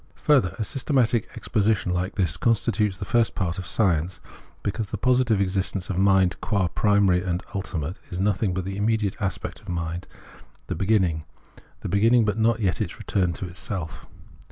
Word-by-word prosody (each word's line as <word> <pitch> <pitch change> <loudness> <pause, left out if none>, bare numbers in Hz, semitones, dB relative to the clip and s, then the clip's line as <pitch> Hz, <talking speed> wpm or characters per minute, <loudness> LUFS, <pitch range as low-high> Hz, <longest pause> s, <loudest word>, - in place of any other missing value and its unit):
Further, 135 - +4
a 110 - -1
systematic 125 -3 +1
exposition 105 -4 0
like 90 +1 -2
this 90 -4 +1
constitutes 105 -1 +1
the 100 - -5
first 115 +2 +2
part 90 -3 -2
of 90 - -6
science,* 85 -2 +1 0.4
because 105 0 -2
the - - -3
positive 125 -4 +2
existence 95 -1 -1
of 95 - -1
mind, 95 -2 +3
qua 95 -4 0
primary 100 -4 +3
and 90 -1 -2
ultimate, 90 -3 -4
is 90 - -4
nothing 100 0 +1
but 90 0 -3
the 95 +1 -4
immediate 105 -1 +1
aspect 95 -2 -3
of - - -11
mind, 85 0 -3 0.6
the - - -3
beginning; 90 -4 +1 0.6
the - - -4
begin 100 +5 +3
ning, 120 -3 +5
but 105 +1 -1
not 115 0 +2
yet 90 -6 0
its - - -3
return 90 -3 0
to 90 - -5
itself. 90 -2 -6
95 Hz, 175 wpm, -25 LUFS, 90-110 Hz, 0.6 s, ning